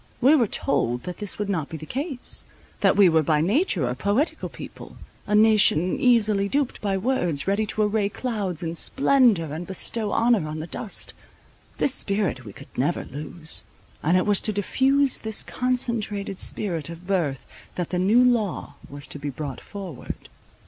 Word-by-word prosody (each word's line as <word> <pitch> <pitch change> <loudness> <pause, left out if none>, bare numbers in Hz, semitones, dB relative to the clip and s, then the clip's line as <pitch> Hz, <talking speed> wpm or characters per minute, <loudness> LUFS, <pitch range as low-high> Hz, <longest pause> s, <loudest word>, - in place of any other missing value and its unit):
We 265 +4 +5
were 245 -7 +3
told 120 -9 0
that 180 -1 -6
this 205 -3 0
would 210 - -2
not 165 -8 -2
be 160 - -6
the 155 - -9
case; 270 - -3 0.4
that - - +4
we 200 -2 +7
were 160 -2 +4
by 155 0 +2
nature 190 - +1
a 125 - -1
poetical 205 - -1
people, - - -11 0.3
a 210 - +1
nation 210 -5 +4
easily 215 -5 +3
duped 280 0 -1
by 195 -2 0
words, 180 - 0
ready 205 +2 +1
to 215 - 0
array 210 -1 +1
clouds 200 -8 -3
in 165 0 -3
splendour, 230 - +3
and 165 +3 -6
bestow 210 +3 -2
honour 230 -8 +2
on 155 +1 -5
the 155 - -4
dust. 195 +4 -3 0.6
This 265 - +2
spirit 195 - 0
we 105 - -8
could - - -15
never - - -1
lose; 155 +4 -3 0.4
and 170 +4 +3
it 185 - +1
was 205 -2 +3
to 215 - +1
diffuse 265 +7 +2
this 220 -1 0
concentrated 225 -6 -1
spirit 165 -7 -1
of 170 +1 -10
birth, 170 -9 -1 0.3
that 175 -2 -3
the 180 - 0
new 215 +7 +4
law 220 -11 0 0.2
was 145 +1 -9
to 145 - -6
be 145 +1 -4
brought 140 0 -6
forward. 190 - -8
200 Hz, 175 wpm, -24 LUFS, 160-225 Hz, 0.6 s, we